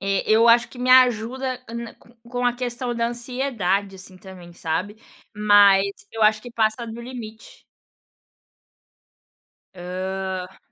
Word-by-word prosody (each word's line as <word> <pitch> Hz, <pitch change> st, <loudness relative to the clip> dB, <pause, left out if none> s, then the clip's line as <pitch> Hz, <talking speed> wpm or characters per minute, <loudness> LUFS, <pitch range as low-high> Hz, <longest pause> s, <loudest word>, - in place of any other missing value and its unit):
É, 195 Hz, 0 st, -1 dB
eu 225 Hz, +2 st, +5 dB
acho 235 Hz, +1 st, +5 dB
que 250 Hz, -, -14 dB
me 255 Hz, 0 st, 0 dB
ajuda 255 Hz, +1 st, +3 dB
ana 235 Hz, 0 st, -7 dB, 0.3 s
com 245 Hz, +1 st, -4 dB
a 245 Hz, -, +3 dB
questão 245 Hz, 0 st, -4 dB
da 235 Hz, 0 st, 0 dB
ansiedade 235 Hz, -6 st, -2 dB
assim 185 Hz, 0 st, -13 dB
também, 185 Hz, -2 st, -13 dB
sabe, 180 Hz, +5 st, -3 dB, 0.4 s
mas 205 Hz, -2 st, +6 dB, 0.3 s
eu 225 Hz, -, -3 dB
acho 215 Hz, 0 st, +3 dB
que 245 Hz, -, -10 dB
passa 225 Hz, 0 st, 0 dB
do 225 Hz, +1 st, -8 dB
limite. 235 Hz, -3 st, -10 dB, 2.1 s
Hã. 185 Hz, +1 st, -5 dB
220 Hz, 130 wpm, -22 LUFS, 195-245 Hz, 2.1 s, mas